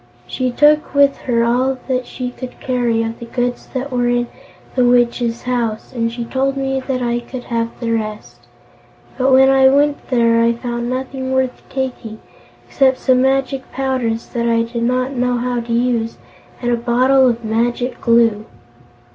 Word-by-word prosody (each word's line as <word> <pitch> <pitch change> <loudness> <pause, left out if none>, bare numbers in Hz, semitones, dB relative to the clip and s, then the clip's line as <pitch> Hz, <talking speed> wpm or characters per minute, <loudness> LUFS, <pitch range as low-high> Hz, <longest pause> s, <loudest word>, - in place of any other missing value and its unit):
She 255 - -2
took 300 +4 +3
with 280 -1 +5
her 235 -1 +3
all 255 +3 +1
that 255 -1 -1
she 250 -1 -5
could 250 0 -9
carry 240 -3 0
of 225 0 -5
the 235 - -8
goods 245 +1 -2
that 265 +2 -3
were 245 -1 0
in 240 0 0 0.4
the 255 - +2
Witch's 240 -1 +2
house, 235 -3 -2
and 230 -2 -1
she 235 0 -5
told 270 +3 -1
me 270 0 -1
I 245 -2 0
could 245 +1 -8
have 230 -1 -2
the 235 -2 -2
rest. 215 -2 -5 0.7
But 260 +1 +3
when 265 +1 +6
I 265 0 +5
went 285 +1 +1
there 230 -2 +3
I 230 0 +3
found 240 0 -4
nothing 260 +1 -4
worth 260 -1 0
taking 250 -5 -4 0.5
except 260 - +2
some 255 -1 +2
magic 270 0 0
powders 255 -4 -1
that 235 -1 -1
I 230 0 +2
did 230 0 -5
not 255 +2 0
know 250 -1 0
how 245 0 -1
to 235 0 -6
use, 235 -1 0 0.5
and 240 - +1
a 240 - +2
bottle 255 +2 +3
of 235 -1 -3
Magic 240 +3 -1
Glue." 230 -2 +3
245 Hz, 170 wpm, -18 LUFS, 235-260 Hz, 0.7 s, when